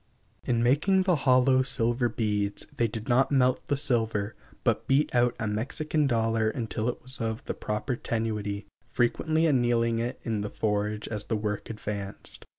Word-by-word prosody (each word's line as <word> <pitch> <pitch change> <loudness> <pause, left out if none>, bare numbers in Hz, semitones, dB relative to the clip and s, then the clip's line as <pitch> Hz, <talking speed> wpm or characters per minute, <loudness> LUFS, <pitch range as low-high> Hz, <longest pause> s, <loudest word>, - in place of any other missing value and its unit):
In 120 -1 +1
making 155 +10 +3
the 185 -2 +3
hollow 130 -1 +4
silver 120 -2 +1
beads 105 -2 -1
they 120 - +2
did 110 0 -7
not 130 +2 +3
melt 130 -2 +2
the 145 - +1
silver, 110 -6 0 0.3
but - - +1
beat 135 +3 +2
out 120 0 +3
a 115 - -1
Mexican 145 +8 0
dollar 115 -2 +1
until 110 0 -2
it 120 - -5
was 130 -1 -4
of 110 0 -3
the - - -2
proper 105 +5 -3
tenuity 105 -3 -3 0.2
frequently 155 +7 +1
annealing 120 -5 +2
it 120 +3 -3
in 110 -3 -1
the 105 - -3
forge 105 0 -1
as 105 -2 -4
the 110 - -1
work 105 -1 -3
advanced. 105 -3 -3
115 Hz, 165 wpm, -28 LUFS, 110-130 Hz, 0.3 s, hollow